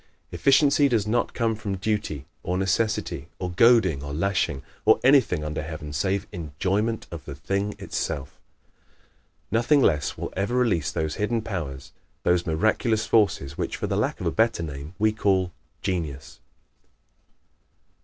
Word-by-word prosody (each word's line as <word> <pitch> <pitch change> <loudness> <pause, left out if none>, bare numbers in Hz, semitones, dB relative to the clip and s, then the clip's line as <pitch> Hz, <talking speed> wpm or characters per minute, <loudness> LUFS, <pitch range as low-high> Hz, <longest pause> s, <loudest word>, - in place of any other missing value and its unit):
Efficiency 140 +1 +4
does 115 -5 +1
not 120 +3 0
come 115 -2 +1
from 100 -2 -4
duty, 95 -8 -2 0.2
or 90 +1 -2
necessity, 95 +4 0
or 90 - -4
goading, 95 - +4
or 70 0 -5
lashing, 85 -5 0 0.2
or - - +5
anything 125 - +4
under 75 0 -3
heaven 80 -1 -7
save 95 +6 0
ENJOYMENT 95 +6 -1
OF 85 -1 -8
THE 70 - -7
THING 100 +8 -2
ITSELF. 70 -1 -4 1.1
Nothing 125 +5 +3
less 75 -2 +1
will - - -5
ever 100 +6 -1
release 110 - +1
those 80 -1 -2
hidden 110 +2 0
powers, 80 -11 -5 0.3
those 90 0 +2
miraculous 110 +6 +1
forces 85 -11 +1
which, - - -2
for - - -3
the - - -1
lack - - 0
of - - -4
a - - +1
better 115 -6 +1
name, 75 +2 -7
we 110 +1 +3
call 95 -4 +1 0.3
"genius." 80 -8 -3
95 Hz, 145 wpm, -25 LUFS, 80-110 Hz, 1.1 s, or